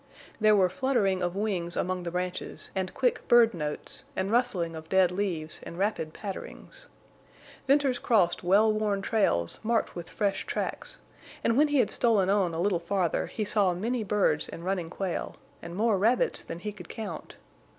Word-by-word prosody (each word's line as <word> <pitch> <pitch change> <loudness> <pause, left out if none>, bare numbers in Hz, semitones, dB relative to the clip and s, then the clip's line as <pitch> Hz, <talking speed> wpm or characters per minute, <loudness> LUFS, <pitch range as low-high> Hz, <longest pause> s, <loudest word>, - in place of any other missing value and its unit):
There 215 -1 +5
were 190 -2 +4
fluttering 200 -3 0
of 175 0 -1
wings 190 -5 -1
among 185 0 -1
the 175 - -4
branches 180 +1 -4
and 190 -1 -2
quick 255 -2 0
bird 235 -1 +6
notes, 150 -3 -4
and 190 +2 -1
rustling 180 -9 +1
of 160 0 -9
dead 190 -2 +4
leaves 180 -5 -3
and 170 - -9
rapid 190 -5 -1
patterings. - - -8 0.8
Venters 275 -2 +3
crossed 185 -8 +2
well 205 +5 +4
worn 210 -2 -1
trails 85 - +1
marked 230 +1 0
with 175 -1 -7
fresh 200 -3 -1
tracks; - - -4 0.5
and 230 - +2
when 300 +4 +5
he 290 -1 +1
had 255 - +3
stolen 205 -5 +3
on 195 -4 +2
a - - -3
little 185 -1 +1
farther 175 -1 -1
he 215 - -3
saw 200 -4 +2
many 230 +5 -1
birds 195 -7 +1
and 170 - -8
running 185 -3 -1
quail, 185 0 -4 0.3
and 170 +1 -8
more 215 -1 +2
rabbits 230 +5 +2
than - - -7
he 210 +5 -5
could 185 -5 -12
count. 220 -2 -7
195 Hz, 175 wpm, -28 LUFS, 175-220 Hz, 0.8 s, bird